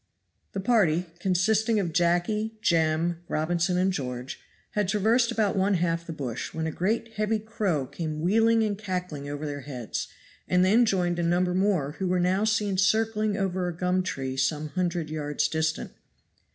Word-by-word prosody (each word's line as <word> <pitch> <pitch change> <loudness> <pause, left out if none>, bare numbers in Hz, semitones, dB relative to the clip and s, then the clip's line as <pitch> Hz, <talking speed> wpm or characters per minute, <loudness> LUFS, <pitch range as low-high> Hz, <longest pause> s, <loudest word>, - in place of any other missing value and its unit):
THE 195 - -2
party, 190 -6 +2
consisting 210 +5 +2
of 175 -5 -2
Jacky, 180 +6 +1
Jem, 165 -2 +2
Robinson 175 +3 0
and 185 +1 +2
George, 125 -4 -5 0.3
had 210 -2 0
traversed 225 +4 +2
about 215 -4 +1
one 195 +1 +2
half 170 -1 -1
the - - -4
bush, 130 -7 -5
when 160 0 -2
a 160 - -1
great 220 +8 -1
heavy 215 +1 +1
crow 210 - -1
came 155 +2 -5
wheeling 225 +6 +3
and 210 -2 0
cackling 180 -8 -4
over 145 +1 -4
their 145 -1 -4
heads, 125 -4 -5 0.4
and 180 0 +3
then 225 +5 +4
joined 175 -4 +1
a - - +1
number 175 +1 +1
more 185 -7 +1
who 190 - 0
were 180 0 +1
now 185 +4 +2
seen 210 -3 +1
circling 215 +1 +2
over 185 -2 -1
a 170 -2 -5
gum 180 +1 +1
tree 135 -7 -3
some 150 +3 0
hundred 175 -2 -2
yards 150 -1 -1
distant. 160 +1 -1
180 Hz, 170 wpm, -27 LUFS, 160-210 Hz, 0.4 s, then